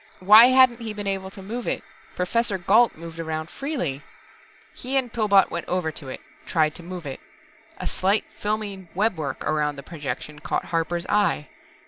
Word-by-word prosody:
Why 215 +5 +9
hadn't 255 -2 +5
he 220 -2 -4
been 205 -1 -5
able 195 -1 -2
to 195 0 -12
move 230 +5 -5
it - - -2 0.3
Professor 205 +3 0
Gault 215 +6 +4
moved 165 0 -9
about 160 0 -4
freely. 255 - -3 0.7
He 265 +2 -1
and 250 -3 0
Pillbot 205 -4 +4
went 170 - -4
over 180 -3 -1
to 140 - -9
it, - - -7 0.3
tried 155 -2 +2
to - - -7
move 175 -1 -7
it. 135 -2 -6 0.6
A - - -6
slight 195 +3 +1
filmy 205 -3 -3
webwork 180 -9 -1
around 150 -1 0
the 140 - -9
projection 150 -1 -6
caught - - -2
Harper's 170 +1 -1
eye. 205 -8 +1
185 Hz, 170 wpm, -24 LUFS, 160-215 Hz, 0.7 s, Why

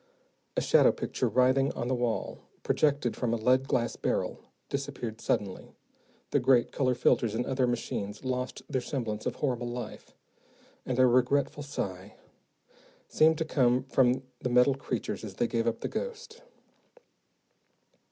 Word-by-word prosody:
A - - +3
shadow - - +5
picture - - -2
writhing 130 +2 +3
on 120 - -3
the 130 - 0
wall, 120 -2 -2 0.2
projected 145 -5 +1
from 115 -2 0
a - - -2
lead 130 +4 +2
glass 115 -1 0
barrel, - - -1 0.3
disappeared 135 -5 -4
suddenly, 100 -3 -2 0.6
the - - +3
great 125 -3 +3
color 130 -2 +1
filters 115 -2 +2
and 120 - -1
other 130 -1 +1
machines 105 -2 -3
lost 125 0 -3
their 130 -3 -1
semblance 115 -6 -3
of - - -2
horrible 125 -4 -2
life, 120 0 -7 0.7
and 125 - -1
a 130 - +6
regretful 130 +4 +2
sigh 100 -8 -5 0.9
seemed 160 0 +4
to 160 - -1
come 130 -4 +2
from 130 -1 +2 0.2
the 125 - -2
metal 125 +3 +5
creatures 135 - -4
as - - -7
they - - +1
gave 115 -1 -1
up 115 - -1
the - - -2
ghost. 475 0 -6
125 Hz, 150 wpm, -29 LUFS, 120-135 Hz, 0.9 s, a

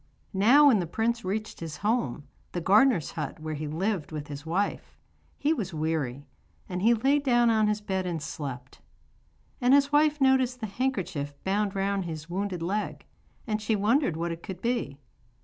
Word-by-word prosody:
Now 240 +10 +6
when 255 -8 +6
the 175 - -2
prince 230 +6 -1
reached 210 +4 -3
his 160 -3 -6
home 215 - 0 0.3
the 175 - -1
gardener's 195 - +4
hut 160 -1 -5
where 155 0 -4
he 150 0 -4
lived 175 +2 -2
with 150 -2 -6
his 145 +2 -7
wife 190 +5 -2 0.4
he 300 +2 +2
was 190 - -4
weary, 150 -4 -2 0.4
and 180 -1 -4
he 230 +4 +5
lay 270 +6 +3
down 240 -4 +3
on 215 -1 +3
his 210 0 0
bed 190 -2 -2
and 170 -2 -2
slept. 135 -4 -7 0.8
And 250 +2 +5
his 280 0 +3
wife 300 0 +3
noticed 260 -2 +3
the 220 - -3
handkerchief 190 - -2
bound 200 +1 0
round 195 -1 0
his 160 -2 -6
wounded 185 -2 -2
leg, 205 +5 -3 0.4
and 215 -2 -2
she 215 +1 +1
wondered 210 - +2
what 170 +1 -2
it 165 0 -6
could 185 -2 -7
be. 235 - -2
195 Hz, 180 wpm, -27 LUFS, 165-235 Hz, 0.8 s, Now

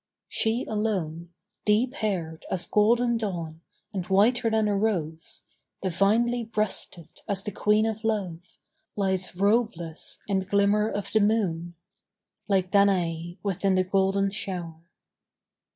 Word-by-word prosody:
She 225 +2 0
alone, 185 -7 -2 0.3
deep 225 +5 +2
haired 180 - -3
As 180 -2 -1
golden 235 +4 +3
dawn, 170 -7 -4 0.3
and 190 -3 -2
whiter 225 +5 +3
than 220 -1 +2
a 205 - +1
rose, 170 -7 -2 0.4
Divinely 220 +6 +2
breasted 210 -6 -3
as 200 -2 -1
the 210 - -4
Queen 210 +2 +2
of 220 0 -3
Love, 200 -7 -1 0.6
Lies 190 -3 0
robeless 200 -5 0
in 195 -2 +1
the 190 - -4
glimmer 200 +2 +2
of 205 -2 -4
the 220 - +4
moon, 180 -6 0 0.7
Like 190 -3 +1
Danaë 175 -4 +2
within 195 -1 +1
the 185 - +3
golden 195 +1 +1
shower. 175 -5 -5
200 Hz, 125 wpm, -26 LUFS, 180-215 Hz, 0.7 s, the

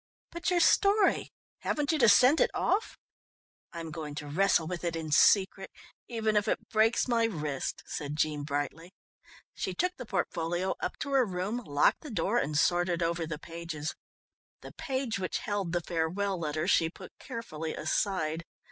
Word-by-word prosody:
"But 340 +4 -2
your 360 -1 +3
story? 400 +3 +4 0.3
Haven't 295 0 0
you 315 - 0
to 235 -4 +6
send 255 +9 +6
it - - +4
off?" 420 +3 0 0.7
"I'm 165 -1 -6
going 155 -2 -6
to 150 - -5
wrestle 170 +2 +2
with 175 +1 -5
it 170 -1 -1
in 160 -2 -4
secret, 190 +4 +4 0.4
even 220 -2 -1
if 210 +1 +2
it - - -2
breaks 225 +3 +3
my 230 -2 +2
wrist," 150 -10 -3
said 145 0 -4
Jean 155 -1 0
brightly. 145 +5 -4 0.6
She - - -4
took 360 0 0
the 245 - -8
portfolio 175 -1 -1
up - - -3
to 280 - -3
her 270 -2 +4
room, 195 +3 -2
locked 145 -5 +2
the 305 - -8
door 230 0 +1
and 150 -7 -1
sorted 175 +1 +2
over 165 0 -1
the 155 -1 -4
pages. 165 -1 -5 0.7
The - - -10
page 260 -5 -2
which 185 - -2
held 205 -4 -2
the 175 0 0
farewell 175 +4 -1
letter 155 -1 -2
she 165 - +3
put 185 +2 -12
carefully 160 -9 -5
aside. 160 0 -1
180 Hz, 170 wpm, -30 LUFS, 160-225 Hz, 0.7 s, to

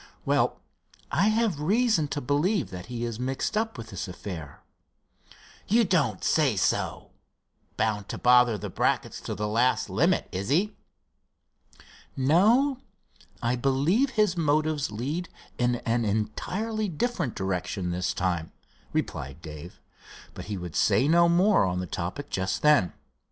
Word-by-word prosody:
"Well, - - +1 0.5
I 205 - +3
have 215 -7 +1
reason 200 0 +2
to 145 0 -3
believe 150 - 0
that 90 -1 -8
he 120 -1 -4
is 115 -1 -5
mixed 135 - -2
up 220 -4 -1
with 115 -1 -8
this - - -5
affair." 90 -5 -8 1.0
"You 230 +3 +4
don't 155 - +1
say 145 -8 +2
so! 95 - -1 0.7
Bound 105 -2 -1
to - - -4
bother 125 -2 +5
the - - -6
Bracketts - - -1
to - - -5
the 105 +2 -2
last 120 +4 +1
limit, - - +2
is 95 +2 -4
he?" 185 +9 +1 1.4
"No, 220 - +3 0.6
I 120 +1 +1
believe 140 - +2
his 210 -4 +3
motives 155 -4 +1
lead 145 +11 -3 0.3
in 120 0 +2
an 120 0 -1
entirely 190 - -2
different 175 - -2
direction 95 -1 -2
this 90 +1 -1
time," 90 -4 -2 0.4
replied 70 +2 -3
Dave, 80 +5 -9 0.5
but - - -8
he 105 -2 -4
would 90 -3 -7
say 110 +6 +3
no 170 +2 +5
more 185 +5 +4
on 90 -1 -1
the 90 - -3
topic 90 - -5
just 95 0 -2
then. 150 - +5
130 Hz, 140 wpm, -27 LUFS, -, 1.4 s, bother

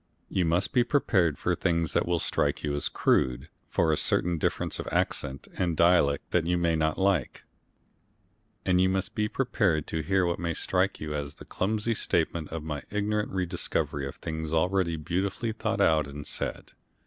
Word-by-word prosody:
You 90 - +1
must 85 +4 +1
be 125 - +5
prepared 95 - +2
for - - 0
things 85 -1 0
that - - +1
will 85 0 +2
strike - - 0
you 75 -1 -1
as 70 - -1
crude, 60 -1 +1 0.2
for 80 -2 +2
a - - +3
certain 85 +2 +1
difference - - -1
of - - -5
accent 65 0 -1
and 85 -3 0
dialect 85 -5 +3
that 85 -2 +1
you 90 0 +2
may 85 -1 +2
not 80 -1 0
like, 95 -8 0 1.2
and 90 0 +3
you 95 - +4
must 95 0 -1
be 105 0 0
prepared 105 - +1
too 80 - -2
to 75 - -11
hear 95 -1 +3
what 85 -1 -1
may 85 -2 -2
strike 95 +1 0
you 75 0 -4
as 70 0 -4
the - - -12
clumsy 110 +4 -1
statement 85 -5 0
of 80 -1 -5
my 75 -2 -4
ignorant 105 +1 -1
rediscovery 90 -6 -2
of 70 - -7
things 80 -1 -4
already 90 0 +1
beautifully 95 +8 -2
thought 110 0 -2
out 80 -3 +3
and 70 +1 -8
said. - - -3
85 Hz, 185 wpm, -28 LUFS, 80-95 Hz, 1.2 s, be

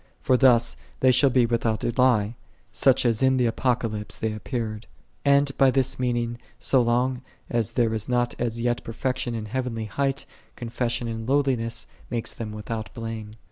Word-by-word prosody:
For 130 - +2
thus 120 -3 +4 0.3
they 130 - +6
shall 135 +2 +5
be 125 -1 +3
without 115 -2 0
a 120 - 0
lie, 120 -5 +3 0.4
such 125 +3 +3
as 115 -2 +2
in 130 0 +4
the 125 - +2
Apocalypse 115 -3 -1
they 110 -1 -2
appeared. 110 -1 -4 0.4
And 140 -1 +3
by 135 - +6
this 130 -1 0
means 120 -1 -1 0.2
so 130 - +3
long 125 +2 +1 0.3
as 115 -1 0
there 115 -2 +2
is 110 +1 -3
not 120 -1 +1
as 115 -1 -2
yet 120 0 0
per 115 - -7
fection 125 -1 -2
in 110 -1 -4
heavenly 115 -1 -3
height, 135 +6 -1 0.3
confession 120 0 -2
in 115 0 -5
low 140 +2 +3
liness 115 -3 -2 0.2
maketh 120 -2 -3
them 110 -2 -4
without 110 +1 -5
blame. 115 -2 -6
120 Hz, 180 wpm, -25 LUFS, 115-130 Hz, 0.4 s, they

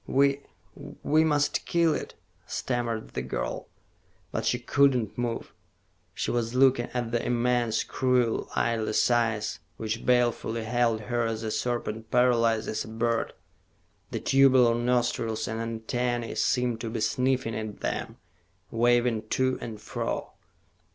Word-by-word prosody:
"We 140 +1 +3 0.3
we 155 +2 0
must 145 -2 +1
kill 170 -2 +3
it," - - -5 0.3
stammered 120 -3 -2
the - - -3
girl. 65 0 -4 0.6
But 110 0 -2
she 125 - +2
could 135 +2 +3
not 110 -5 -2
move. 120 -1 -3 0.6
She - - -1
was 120 0 -1
looking 130 -2 +4
at 120 -2 -2
the 120 -1 0
immense, 120 -2 +1
cruel, 125 -3 +1
lidless 115 0 +1
eyes, 115 -3 0 0.2
which 110 0 -3
balefully 120 -2 +1
held 115 -1 +1
her 120 +1 -1
as 115 0 -3
a 110 - -2
serpent 115 -2 -2
paralyzes 115 -3 +2
a - - -11
bird. 115 +1 -1 0.8
The - - -3
tubular 130 -3 +5
nostrils 120 -2 0
and 110 +1 -3
antennae 115 +1 -2
seemed 125 -3 0
to 115 - -3
be 115 - -3
sniffing 125 0 0
at 110 -1 -5
them, - - -3 0.5
waving 120 -1 +2
to 130 0 +1
and 110 -2 -6
fro. 110 - -4
120 Hz, 135 wpm, -27 LUFS, 110-125 Hz, 0.8 s, tubular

